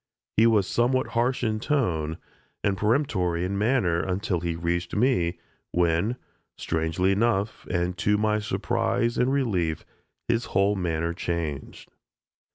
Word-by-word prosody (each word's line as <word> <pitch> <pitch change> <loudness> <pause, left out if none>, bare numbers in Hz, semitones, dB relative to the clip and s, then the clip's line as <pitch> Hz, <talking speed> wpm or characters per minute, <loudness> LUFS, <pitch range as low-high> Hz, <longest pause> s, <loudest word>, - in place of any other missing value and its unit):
He 115 +2 +5
was 105 -4 +3
somewhat 125 +5 +1
harsh 120 +2 +1
in 110 -2 0
tone, 90 - 0 0.5
and 100 -1 +2
peremptory 105 - +1
in 95 +2 -2
manner 105 -5 +2
until 95 0 -1
he 85 -1 -2
reached 85 +1 -2
me, 105 -7 +2 0.4
when, 85 +6 +2 0.4
strangely 80 +4 0
enough, 105 0 0
and 90 0 0
to 105 0 +2
my 105 0 +1
surprise 120 +2 0
and 125 +2 +2
relief, 95 - 0 0.4
his 115 +1 +1
whole 100 +2 +2
manner 85 -2 -1
changed. 85 -5 -4
95 Hz, 130 wpm, -26 LUFS, 85-115 Hz, 0.5 s, He